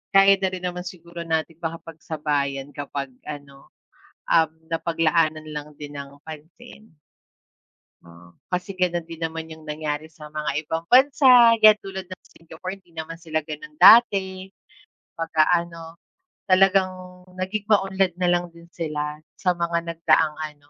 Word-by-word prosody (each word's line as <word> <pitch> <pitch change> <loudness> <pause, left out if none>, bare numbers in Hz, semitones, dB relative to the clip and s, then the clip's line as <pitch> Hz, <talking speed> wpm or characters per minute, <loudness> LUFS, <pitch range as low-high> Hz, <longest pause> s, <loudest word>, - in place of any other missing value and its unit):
kaya 195 0 +7
na 190 - +2
rin 185 -1 -6
naman 180 0 -4
siguro 170 -1 -9
natin 160 0 -2
makapagsabayan 150 -4 -3
kapag 140 -1 -5 0.2
ano, 140 -2 -10 0.6
um, 160 -1 +4 0.2
napaglaanan 160 -1 0
lang 150 0 -7
din 145 -1 -9
ng 140 0 -9
pansin. 165 +8 -13 1.1
Oo, 85 +1 -16 0.2
kasi 180 +2 -3
ganun 175 -2 0
din 165 0 -11
naman 165 0 -5
yung 160 -1 -12
nangyari 150 0 -4
sa 150 -2 -13
mga 150 -2 -3
ibang 160 +2 -4
bansa, 255 -3 +6
'yan 215 -1 +8
tulad 190 -1 -7
ng 185 0 -11
Singapore, 180 +4 -9
hindi 175 -3 -27
naman 160 +1 -7
sila 155 -2 -3
ganun 155 - -9
dati. 195 -8 +6 0.7
Pagka 160 -2 +1
ano, 170 -1 -3 0.5
talagang 185 -1 +1
naging 190 +3 -4
maunlad 195 -3 +2
na 180 +1 -1
lang 175 0 +1
din 170 0 -16
sila, 150 -3 -4 0.2
sa 180 -2 -1
mga 170 0 -2
nagdaang 165 -2 +2
ano, 150 -2 -8
165 Hz, 140 wpm, -23 LUFS, 155-185 Hz, 1.1 s, yan